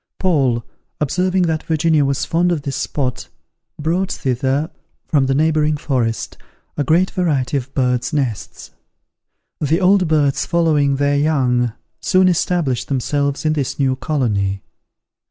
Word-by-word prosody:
Paul, 135 -10 +1 0.3
observing 180 +5 +1
that 160 -2 0
Virginia 160 -1 +2
was 140 -1 0
fond 175 +2 +1
of 155 -5 -2
this 140 -2 -3
spot, 130 -4 -3 0.5
brought 175 +5 -1
thither, 135 +4 -1 0.3
from 140 -4 +1
the 135 - +1
neighbouring 155 0 +2
forest, 125 -6 -2 0.4
a 145 - 0
great 170 +7 +2
variety 150 -7 0
of 135 0 -5
bird's 125 -2 0
nests. 135 -9 -3 0.9
The 155 +3 +1
old 190 -1 +3
birds 150 -3 +2
following 155 -5 +2
their 145 +1 +1
young, 125 -6 +1 0.3
soon 185 0 +3
established 170 -7 0
themselves 140 +2 -1
in 155 - +2
this 145 -4 -2
new 135 -2 +1
colony. 105 -10 -1
145 Hz, 135 wpm, -19 LUFS, 130-160 Hz, 0.9 s, old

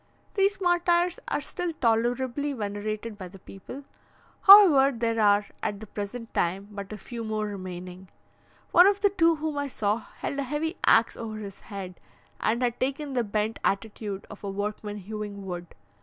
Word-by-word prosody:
These 395 0 +2
martyrs 350 -1 +2
are - - -1
still 355 -3 -4
tolerably 245 +3 0
venerated 210 -1 -4
by 185 - -6
the 185 - -13
people; 195 +9 -10 0.6
however, 300 - +8
there 230 -1 0
are 205 0 +4 0.2
at 205 - -2
the 220 - -8
present 215 +3 -6
time 190 +4 -1
but 200 -1 -7
a 215 - -5
few 230 +2 -7
more 215 -1 -2
remaining. 185 -2 -7 0.6
One 355 +2 +8
of 405 0 +2
the 405 -1 +4
two 335 -4 +3
whom 305 -1 -3
I 285 - -1
saw, 210 -5 0
held 280 +4 -6
a - - 0
heavy 300 +5 -2
axe 225 0 +5
over 220 -2 -6
his 200 -2 -8
head, 190 -3 -8 0.4
and 235 +3 +1
had 240 -1 -1
taken 275 +2 -2
the 245 -2 +1
bent 215 +1 -2
attitude 205 -1 -2
of 210 - -12
a 200 - -3
workman 205 +1 -4
hewing 205 0 -6
wood. 175 -2 -5
220 Hz, 170 wpm, -27 LUFS, 205-285 Hz, 0.6 s, however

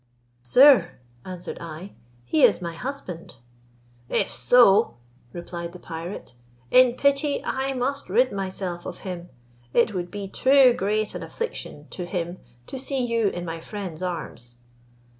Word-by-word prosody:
"Sir," 220 - +6 0.3
answered 180 -1 -7
I, 170 +4 -8 0.3
"he 155 +6 +1
is - - +6
my 170 -2 -5
husband." 185 -4 -7 0.7
"If - - 0
so," 215 - +5 0.4
replied 170 +1 -7
the 180 - -10
pirate, 165 -2 -7 0.4
"in 255 -1 +6
pity 280 +2 +1
I 270 +1 -1
must 275 +1 -2
rid 250 +7 +3
myself 185 -3 -4
of - - -8
him: 180 -2 -6 0.5
it 235 -2 +3
would 175 -2 -3
be 200 0 -6
too 260 +4 +5
great 215 +1 -1
an - - -6
affliction 305 - -6
to 180 -2 -6
him 175 0 -4 0.3
to 265 - -7
see 265 -1 -1
you 230 -3 +1
in 175 -2 -3
my 165 0 -5
friend's 185 -2 -7
arms." 145 -9 -5
190 Hz, 140 wpm, -24 LUFS, 175-250 Hz, 0.7 s, Sir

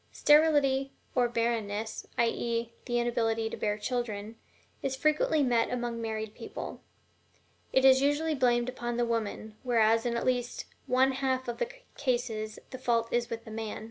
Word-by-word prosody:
Sterility, 290 -3 +4 0.2
or 245 -2 +2
barrenness, 225 -2 -2
i. 235 - +4
e., 230 0 -2
the 240 -1 0
inability 225 -2 0
to - - -3
bear 210 -1 -1
children, 220 -2 -3 0.5
is 270 -1 -1
frequently 305 +1 +2
met 240 -3 +3
with - - -2
among 240 -1 -3
married 220 -1 -3
people. - - -7 0.9
It 265 0 +4
is 265 0 +7
usually 290 +3 +2
blamed 245 -3 +2
upon 240 -2 -3
the 240 - +2
woman, 220 -2 -3
whereas 225 -2 +3
in 235 0 0
at - - -2
least 245 -1 -1 0.2
one 260 +2 +4
half 260 -1 -1
of 240 - -4
the 485 - -1 0.3
cases 240 -5 -1
the 260 - -7
fault 230 -2 0
is 240 0 +1
with 230 0 -5
the 220 - -9
man. 220 -1 -4
240 Hz, 170 wpm, -30 LUFS, 225-260 Hz, 0.9 s, is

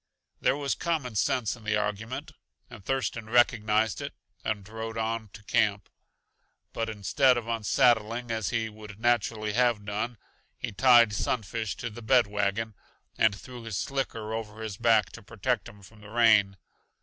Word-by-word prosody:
There - - +2
was 140 -2 0
common 155 -8 -2
sense 115 +3 +1
in 115 - -16
the 105 0 +1
argument, 105 +4 -3 0.4
and - - -11
Thurston 115 -2 -2
recognized 110 -2 +3
it - - -6 0.3
and 105 -3 -3
rode 110 +1 -6
on 110 -1 -2
to 105 - -12
camp. 105 -1 +1 0.8
But 115 0 -2
instead 120 +5 +3
of 115 -1 -4
unsaddling, 115 +1 +2
as 110 -3 -1
he 115 -1 0
would 105 -1 -11
naturally 110 -2 +1
have 120 -3 +2
done, 110 +3 -3 0.4
he - - -4
tied 115 +1 +6
Sunfish 110 0 -2
to 115 - -5
the 120 - -9
bed 120 +1 +4
wagon 105 +2 -1 0.4
and 110 -2 +3
threw 125 -2 -10
his 115 -4 -4
slicker 115 -3 -3
over 110 -1 -5
his 110 -3 -4
back 115 -4 +3
to 115 - -10
protect 110 +1 -2
him 100 -1 -16
from 105 +2 -16
the 105 - -12
rain. 110 -4 +4
110 Hz, 160 wpm, -28 LUFS, 105-120 Hz, 0.8 s, tied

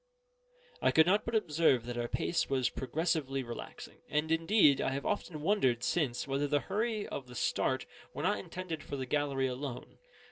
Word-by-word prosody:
I - - +4
could 160 - +6
not 200 +4 +3
but 230 - -2
observe 155 - +3
that 120 0 -4
our 120 0 -2
pace 170 - -1
was 130 -2 +1
progressively 135 -1 -1
relaxing; 120 -1 -8
and 150 +2 0
indeed 165 -3 +4
I - - +1
have 140 - -4
often 180 -7 -2
wondered 130 - +2
since 135 -8 0
whether 140 +2 0
the 145 0 +1
hurry 215 - -1
of 130 - -5
the 125 - -11
start - - 0 0.3
were - - -5
not - - +1
intended 170 - -5
for 145 - -6
the 130 -1 -3
gallery 140 0 0
alone. 130 0 -5
145 Hz, 180 wpm, -32 LUFS, 130-170 Hz, 0.3 s, could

